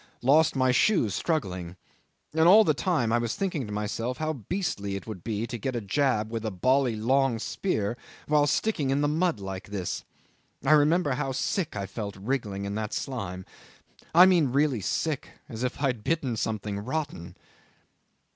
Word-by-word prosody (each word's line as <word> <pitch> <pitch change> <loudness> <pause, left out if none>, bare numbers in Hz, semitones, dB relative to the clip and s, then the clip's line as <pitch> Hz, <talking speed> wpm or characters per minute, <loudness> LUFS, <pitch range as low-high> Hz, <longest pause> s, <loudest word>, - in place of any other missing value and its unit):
Lost 150 +5 +4
my 130 -1 +3
shoes 125 - +3
struggling. 90 - -2 0.6
And 160 +1 +4
all 210 +5 +8
the 155 - +3
time 140 -8 0
I 120 - +3
was 115 -1 -2
thinking 175 - -2
to - - -7
myself 110 +4 -3
how 155 +1 -1
beastly 120 - -3
it 100 - -6
would 105 -6 -8
be 110 0 -2
to 120 0 -6
get 130 +4 -3
a - - 0
jab 110 0 0
with 115 -1 -3
a 110 - -1
bally 125 +5 +2
long 130 +2 +2
spear 110 - -2 0.3
while 150 -1 +3
sticking 150 -3 0
in 135 +2 +1
the 145 - +2
mud 160 - +1
like 95 -1 -6
this. 100 -3 -4 0.6
I - - +3
remember 155 +1 +4
how 130 +1 -1
sick 160 - -1
I 100 -1 -3
felt 100 0 -6
wriggling 100 -2 -3
in 100 - -3
that 110 0 -3
slime. 95 -8 -4 0.7
I 175 +3 +8
mean 170 -8 +4
really 140 -4 +2
sick 150 - -2
as 115 -1 -7
if 125 0 -2
I 140 - -1
had 120 -4 -4
bitten 140 -6 0
something 105 -2 -3
rotten." 130 - -4
125 Hz, 180 wpm, -27 LUFS, 105-150 Hz, 0.7 s, all